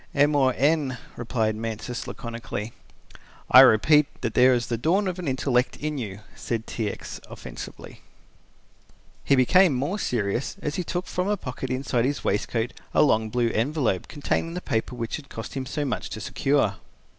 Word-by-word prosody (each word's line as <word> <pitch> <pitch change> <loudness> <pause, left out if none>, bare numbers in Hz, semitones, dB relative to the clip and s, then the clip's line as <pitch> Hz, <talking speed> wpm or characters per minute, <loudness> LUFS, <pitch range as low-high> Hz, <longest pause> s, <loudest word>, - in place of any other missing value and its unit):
"M. 145 +1 +4
or 135 -2 +4
N.," 140 -2 +2 0.2
replied 110 -2 -1
Mansus, 115 +2 -5
laconically. 115 -2 -6 0.8
"I - - +10
repeat 150 +7 +6
that 110 - -2
there 125 +1 +6
is 120 -1 +1
the 120 - -2
dawn 175 - +1
of 185 0 -3
an 175 - -4
intellect 130 -1 +1
in 150 -1 -3
you," 105 -3 -6
said 115 -2 -3
T. 110 -3 -2
X., - - -7
offensively. - - -9 1.2
He 140 - +4
became 160 +5 +5
more 145 +11 -1
serious 115 - -1
as 150 - -3
he 180 - -2
took 175 +2 -3
from 180 +1 -2
a 210 0 +1
pocket 130 -5 -5
inside 130 -2 0
his 140 +1 -1
waistcoat 115 +3 -1 0.2
a - - +6
long 110 -6 +2
blue 120 0 +1
envelope 120 - 0
containing 165 +3 -2
the - - -2
paper 125 -6 -2
which 115 -2 -3
had 140 -3 -13
cost 115 -1 -7
him 135 -1 -4
so 145 +2 -2
much 130 - -3
to 110 - -6
secure. 135 -4 +1
130 Hz, 175 wpm, -25 LUFS, 115-150 Hz, 1.2 s, I